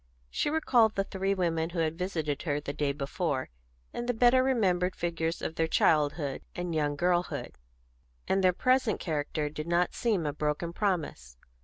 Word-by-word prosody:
She -, -, 0 dB
recalled 245 Hz, -8 st, +3 dB
the 195 Hz, -, +1 dB
three 195 Hz, 0 st, -1 dB
women 165 Hz, -3 st, 0 dB
who 175 Hz, -, -7 dB
had 160 Hz, -1 st, 0 dB
visited 160 Hz, -5 st, -2 dB
her 145 Hz, -3 st, -1 dB
the 145 Hz, -1 st, -5 dB
day 145 Hz, -1 st, 0 dB
before, 140 Hz, -, -2 dB, 0.4 s
in 240 Hz, -, -4 dB
the 245 Hz, -, 0 dB
better 245 Hz, +2 st, +5 dB
remembered 190 Hz, -9 st, +1 dB
figures 165 Hz, -1 st, -2 dB
of -, -, -2 dB
their 165 Hz, -1 st, 0 dB
childhood 150 Hz, -3 st, +2 dB
and 175 Hz, -1 st, -3 dB
young 150 Hz, -2 st, 0 dB
girlhood; 175 Hz, +2 st, -1 dB, 0.7 s
and 195 Hz, 0 st, +1 dB
their 185 Hz, -, +6 dB
present 255 Hz, +2 st, +2 dB
character 150 Hz, -2 st, -2 dB
did 155 Hz, +1 st, -6 dB
not 170 Hz, +1 st, +1 dB
seem 210 Hz, -9 st, 0 dB
a 145 Hz, -, -1 dB
broken 150 Hz, +3 st, -2 dB
promise. 155 Hz, -, -2 dB
170 Hz, 170 wpm, -29 LUFS, 150-195 Hz, 0.7 s, their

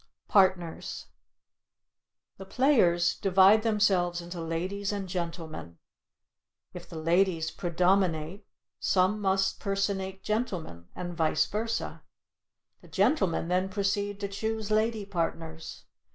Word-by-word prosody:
PARTNERS 185 Hz, -4 st, +1 dB, 1.3 s
The 195 Hz, -, -9 dB
players 195 Hz, -10 st, +3 dB
divide 195 Hz, +2 st, +5 dB
themselves 195 Hz, -6 st, +2 dB
into 175 Hz, 0 st, -7 dB
ladies 185 Hz, +5 st, -3 dB
and 200 Hz, -2 st, -4 dB
gentlemen, 165 Hz, -, -5 dB, 1.0 s
if -, -, -10 dB
the 165 Hz, -, -8 dB
ladies 165 Hz, 0 st, +1 dB
predominate 180 Hz, 0 st, 0 dB, 0.4 s
some 190 Hz, +3 st, +2 dB
must 190 Hz, -1 st, +1 dB
personate 195 Hz, -1 st, -2 dB
gentlemen, 180 Hz, -, -3 dB
and 175 Hz, -1 st, -5 dB
vice 160 Hz, -1 st, +2 dB
versa. 225 Hz, +2 st, -3 dB, 0.8 s
The -, -, -16 dB
gentlemen 195 Hz, -, +1 dB
then 185 Hz, +2 st, +1 dB
proceed 200 Hz, 0 st, -1 dB
to 200 Hz, -, -1 dB
choose 220 Hz, +1 st, -3 dB
lady 215 Hz, -1 st, +1 dB
partners. 165 Hz, -3 st, -4 dB
190 Hz, 105 wpm, -28 LUFS, 170-205 Hz, 1.3 s, divide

